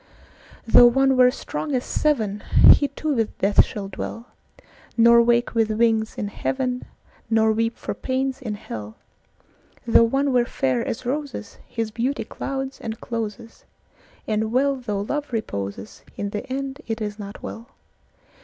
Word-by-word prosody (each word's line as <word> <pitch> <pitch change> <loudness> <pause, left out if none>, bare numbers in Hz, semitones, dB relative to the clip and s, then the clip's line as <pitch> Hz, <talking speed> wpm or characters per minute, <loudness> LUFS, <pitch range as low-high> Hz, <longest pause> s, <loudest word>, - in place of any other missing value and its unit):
Though 240 +1 +8
one 270 +2 +3
were 250 -1 +6
strong 200 - -4
as 250 - -1
seven, 220 -10 0 0.3
He 285 - +4
too 310 +1 -3
with 225 -4 -1
death 200 +1 +5
shall 200 -2 -6
dwell, 230 +4 -7 0.7
Nor 235 0 +7
wake 235 +1 +2
with 225 -2 +2
wings 220 0 +1
in 205 - -2
heaven, 250 +3 -2 0.4
Nor 220 -1 +3
weep 225 +1 -1
for - - -4
pains 265 +1 -2
in 220 -5 -4
hell; 110 - -8 0.9
Though 230 0 +6
one 270 +3 +1
were 245 -1 +3
fair 130 - 0
as 235 - -4
roses, 275 -4 -4
His 225 -2 -3
beauty 245 +6 -1
clouds 270 0 -5
and 220 -1 -5
closes; 230 0 -6 0.6
And 220 0 0
well 275 +3 +2
though 210 -6 -3
love 290 +7 -3
reposes, 100 - -5 0.2
In 200 0 -3
the 210 +5 -5
end 275 +2 -4
it 225 0 -3
is 210 -1 -4
not 200 0 -8
well. 230 +2 -7
230 Hz, 155 wpm, -23 LUFS, 215-260 Hz, 0.9 s, Though